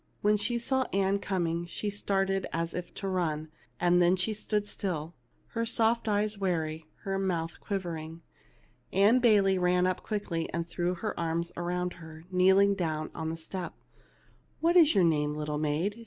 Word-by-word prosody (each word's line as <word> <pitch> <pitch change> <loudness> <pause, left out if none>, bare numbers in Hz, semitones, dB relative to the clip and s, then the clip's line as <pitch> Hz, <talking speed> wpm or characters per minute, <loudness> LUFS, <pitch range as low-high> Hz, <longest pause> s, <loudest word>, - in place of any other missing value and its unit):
When 210 +1 +4
she 235 +3 0
saw 260 +2 0
Ann 195 0 +2
coming 175 -3 -1
she 205 +4 -3
started 195 -1 0
as 165 0 -2
if 180 -1 -5
to 195 - -4
run; 160 -5 -1 0.3
then 175 0 +4
she 190 +4 -1
stood 210 0 -1
still, 175 -6 -4 0.4
her 230 - -2
soft 230 0 +1
eyes 210 0 0
wary, 160 -4 -1 0.2
her 195 0 -1
mouth 170 -4 -2
quiv 200 -2 -1
ering. 165 -1 -6 0.7
Ann 205 +6 +5
Bayley 200 -5 +4
ran 180 0 +3
up 185 -1 0
quickly, 190 -6 -3
and 170 0 -2
threw 175 +1 -1
her 210 +3 -4
arms 170 +1 -1
around 180 +1 -2
her, 160 0 -11
kneeling 190 +2 +5
down 160 -5 -2
on 160 -1 -3
the 165 - -4
step. 175 +2 -5 0.4
" - - -35
What 335 +2 +2
is 320 -7 +7
your 190 - +5
name, 150 -3 +2
little 150 0 -2
maid 160 +9 -1
180 Hz, 170 wpm, -29 LUFS, 165-205 Hz, 0.7 s, is